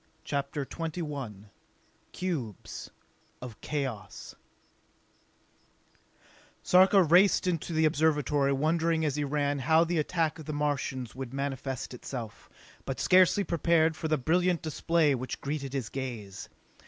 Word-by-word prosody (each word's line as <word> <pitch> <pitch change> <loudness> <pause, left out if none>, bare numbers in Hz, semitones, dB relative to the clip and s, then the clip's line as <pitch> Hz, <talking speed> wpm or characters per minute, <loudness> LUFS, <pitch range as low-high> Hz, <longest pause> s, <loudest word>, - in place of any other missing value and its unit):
CHAPTER 140 0 -3
XXI 145 - -6 0.6
Cubes 145 - -5 0.5
of 120 -3 -9
Chaos 135 -8 -5 2.3
Sarka 190 +1 +6
raced 180 +6 +5
into 170 -2 -1
the 160 -1 +2
Observatory, 150 -2 +2
wondering 160 +3 +1
as 145 -3 0
he 150 - -1
ran 145 0 0
how 160 +5 +4
the 170 -1 0
attack 160 0 0
of 155 - -9
the 155 - -4
Martians 140 -4 -2
would 130 0 -7
manifest 135 -2 -4
itself; 120 -3 -7 0.3
but 135 - -4
scarcely 185 +2 +5
prepared 165 -2 +2
for 160 - -3
the 155 0 +2
brilliant 175 +5 +1
display 160 -1 +2
which 130 0 -4
greeted 140 -1 -4
his 130 -5 -3
gaze. 120 -8 -6
150 Hz, 120 wpm, -29 LUFS, 135-165 Hz, 2.3 s, Sarka